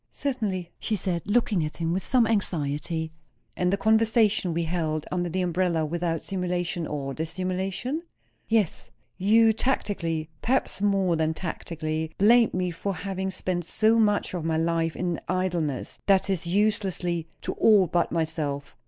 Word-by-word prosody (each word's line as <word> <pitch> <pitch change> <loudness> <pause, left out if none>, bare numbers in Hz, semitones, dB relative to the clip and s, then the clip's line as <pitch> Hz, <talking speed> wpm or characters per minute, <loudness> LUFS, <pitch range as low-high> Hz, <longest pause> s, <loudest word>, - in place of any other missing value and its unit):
"Certainly!" 205 -10 -2
she 220 - -1
said, 180 -4 -1
looking 205 -5 +2
at 150 - -5
him 165 0 -1
with 185 - -1
some 250 -3 +3
anxiety. 160 -6 -1 0.4
"And 180 0 +1
the 200 - +2
conversation 220 -3 +3
we 170 +1 0
held 160 -2 -1
under 175 -1 -1
the 185 +2 -1
umbrella, 175 -2 +1
without 165 0 -2
simulation 175 -3 -2
or 140 -2 -4
dissimulation?" 185 - -2 0.5
"Yes." 210 - +1 0.3
"You 220 +3 +5
tacitly 170 -10 -1
perhaps 255 -5 0
more 195 -4 +2
than 160 0 0
tacitly 160 -2 -4
blamed 230 +2 +5
me 180 -1 0
for 195 +3 -3
having 190 +2 -3
spent 185 -1 -2
so 220 +6 +2
much 210 -3 +2
of 175 -3 -3
my 160 0 0
life 165 0 0
in 175 -2 -2
idleness; 175 -7 -1
that 195 0 +4
is 175 -3 -1
uselessly, 190 -4 0 0.2
to - - -2
all 210 -4 +5
but 175 0 0
myself." 155 -4 -2
180 Hz, 150 wpm, -26 LUFS, 165-200 Hz, 0.5 s, You